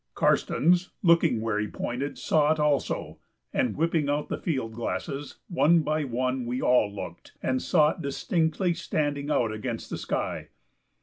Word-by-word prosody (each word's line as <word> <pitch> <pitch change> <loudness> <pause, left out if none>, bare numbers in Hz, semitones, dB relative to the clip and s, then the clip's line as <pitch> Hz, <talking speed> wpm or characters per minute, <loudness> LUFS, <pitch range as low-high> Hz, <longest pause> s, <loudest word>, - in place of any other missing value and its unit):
Karstens, 180 +3 +2
looking 165 - +4
where 110 -2 0
he 105 - -1
pointed, 125 +7 -4
saw 150 -1 +2
it 155 - +1
also, 150 -2 0 0.3
and, 125 -4 0
whipping 160 -2 +1
out 145 +1 -1
the - - -2
field 130 -9 -2
glasses, 120 +6 -4
one 170 -1 +4
by 155 0 -1
one 130 0 -1
we 125 +1 -2
all 125 -6 +3
looked, 100 - -8
and 130 0 0
saw 155 -3 +4
it - - -8
distinctly 160 +4 0
standing 145 -4 -2
out 120 -6 +2
against 110 -1 -5
the - - -3
sky. - - -3
145 Hz, 160 wpm, -27 LUFS, 125-160 Hz, 0.3 s, looking